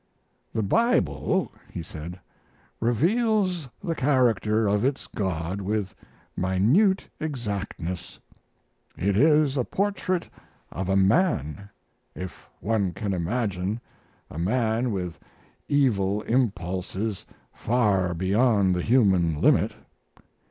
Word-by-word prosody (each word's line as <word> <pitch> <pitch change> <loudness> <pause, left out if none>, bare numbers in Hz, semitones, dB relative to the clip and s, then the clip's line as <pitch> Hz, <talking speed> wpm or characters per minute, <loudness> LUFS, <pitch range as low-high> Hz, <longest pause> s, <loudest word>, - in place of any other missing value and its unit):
"The 110 - -1
Bible," 100 - +1 0.2
he 85 - -5
said, 80 +3 -8 0.6
"reveals 180 - +1
the 170 -4 -1
character 120 -7 +2
of 105 +1 +2
its 135 +1 0
God 95 -2 -3
with 100 0 -2 0.4
minute 120 - +2
exactness. 105 - -4 0.8
It 100 +3 +1
is 150 +2 +4
a 125 - +2
portrait 190 - -1 0.4
of 95 +1 -4
a 95 - +2
man, 100 - +1 0.5
if 95 0 -8
one 100 -3 0
can 100 0 -3
imagine 95 +2 -1 0.5
a 80 - -6
man 115 +5 +1
with 90 -5 -4 0.5
evil 105 -8 +2
impulses 100 -3 -1 0.3
far 100 -7 +1
beyond 100 +1 +3
the 90 - 0
human 95 - +3
limit. - - +3
105 Hz, 100 wpm, -26 LUFS, 95-130 Hz, 0.8 s, is